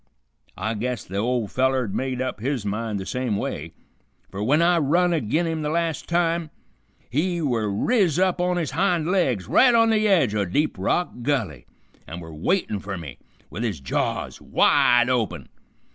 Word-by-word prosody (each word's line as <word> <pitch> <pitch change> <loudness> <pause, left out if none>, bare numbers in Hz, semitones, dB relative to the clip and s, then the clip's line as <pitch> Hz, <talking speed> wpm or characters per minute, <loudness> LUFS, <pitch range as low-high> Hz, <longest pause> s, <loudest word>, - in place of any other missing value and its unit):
I 110 - -2
guess 120 +2 -3
the 95 - -6
ol' 120 +1 0
feller 130 +3 +1
had 100 - -6
made 130 -1 -2
up 130 -5 -4
his 125 -1 -2
mind 105 0 -2
the 95 - -6
same 125 -3 -2
way, - - -4 0.6
fer 95 - -7
w'en 130 +9 +2
I 170 0 +4
run 170 +4 +2
agin 155 +3 0
him 160 -1 -2
the 150 - -2
las' 165 -1 -1
time, 170 -1 0 0.6
he 170 +7 0
were 120 -9 0
riz 175 - +1
up 185 -1 +2
on 180 0 +1
his 165 -4 -2
hind 180 -3 +1
legs 130 - +1
right 250 -2 +5
on 230 -1 +4
the 215 -1 +2
edge 165 - +3
o' 105 -1 +1
Deep 145 - 0
Rock 175 - 0
Gulley, 110 - -2 0.4
and 80 - -7
were 80 -2 -10
waitin' 105 - -1
fer 95 0 -5
me 75 -7 -9 0.3
with 105 - -5
his 105 -10 -2
jaws 65 - -3
wide 120 0 +4
open. 125 -5 -1
130 Hz, 180 wpm, -23 LUFS, 105-170 Hz, 0.6 s, right